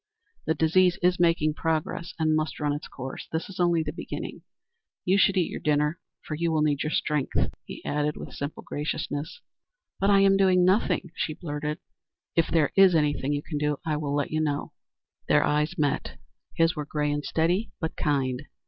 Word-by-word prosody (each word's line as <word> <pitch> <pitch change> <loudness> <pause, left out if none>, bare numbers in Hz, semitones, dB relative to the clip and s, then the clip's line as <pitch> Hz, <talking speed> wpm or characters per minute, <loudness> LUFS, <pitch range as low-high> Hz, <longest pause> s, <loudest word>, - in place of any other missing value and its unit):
"The 160 - +2
disease 175 +3 +3
is 180 0 +3
making 165 -3 +3
progress 165 +3 -2
and 155 -1 +2
must 155 0 -1
run 145 -1 0
its 145 - -5
course. 130 0 -7
This 160 +5 -3
is 185 - -11
only 170 -2 +3
the 150 - -4
beginning. - - -6 0.6
You 190 +2 +3
should 195 0 +4
eat 175 - +1
your - - -4
dinner, 150 +2 +1 0.3
for - - -5
you 165 +2 0
will 155 -1 +2
need 145 -2 +1
your 155 - -1
strength," 150 -3 0
he - - -9
added 150 0 -1
with - - -8
simple 140 +2 -5
graciousness. 150 +2 -4 0.6
"But 195 - +2
I 200 -1 +6
am 195 0 +5
doing 185 -2 +4
nothing," 185 -2 +2
she 155 - -2
blurted. 150 -2 -4 0.6
"If 165 - +3
there 160 -3 +2
is 195 -3 +7
anything 145 -2 +1
you 145 0 -2
can 150 -3 -4
do 150 -1 0
I 155 -2 0
will 145 -1 -2
let 145 -1 -1
you 155 0 0
know." 145 -2 -1 0.6
Their - - +4
eyes 150 +4 0
met. 145 -3 -1 0.4
His 165 +1 +3
were 150 -2 -4
gray 150 -1 0
and 145 0 -2
steady, 175 +9 +1
but 160 -2 -3
kind. 135 -3 0
155 Hz, 195 wpm, -26 LUFS, 150-175 Hz, 0.6 s, is